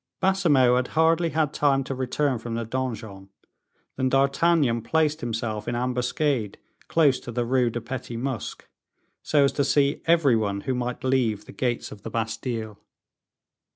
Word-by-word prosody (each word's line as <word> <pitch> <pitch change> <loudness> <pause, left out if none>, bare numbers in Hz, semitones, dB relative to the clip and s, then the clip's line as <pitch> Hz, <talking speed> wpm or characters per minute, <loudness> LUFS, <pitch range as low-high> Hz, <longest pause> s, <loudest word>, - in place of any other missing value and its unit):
Baisemeaux 150 -11 +3
had 125 0 0
hardly 165 +1 +3
had 155 -3 0
time 135 -2 +2
to 135 - -4
return 130 0 -1
from 115 0 -5
the 115 0 -3
donjon, 110 -6 -5 0.7
than 130 0 +1
D'Artagnan 135 -1 +2
placed 155 +4 0
himself 115 -2 -3
in 120 - -1
ambuscade 125 -1 -1 0.3
close 145 -6 +3
to 120 - -8
the 120 0 -1
Rue 125 0 +2
de 120 +1 -4
Petit 120 0 -6
Musc, 130 -2 -4 0.6
so 145 -2 +3
as 140 - +3
to 140 - 0
see 140 +1 +2
every 165 -7 +4
one 100 -3 -1
who 130 - -2
might 125 0 -3
leave 120 -6 +1
the - - -11
gates 120 -2 -2
of 100 - -10
the 115 - -6
Bastile. 110 -1 -4
125 Hz, 160 wpm, -25 LUFS, 115-140 Hz, 0.7 s, every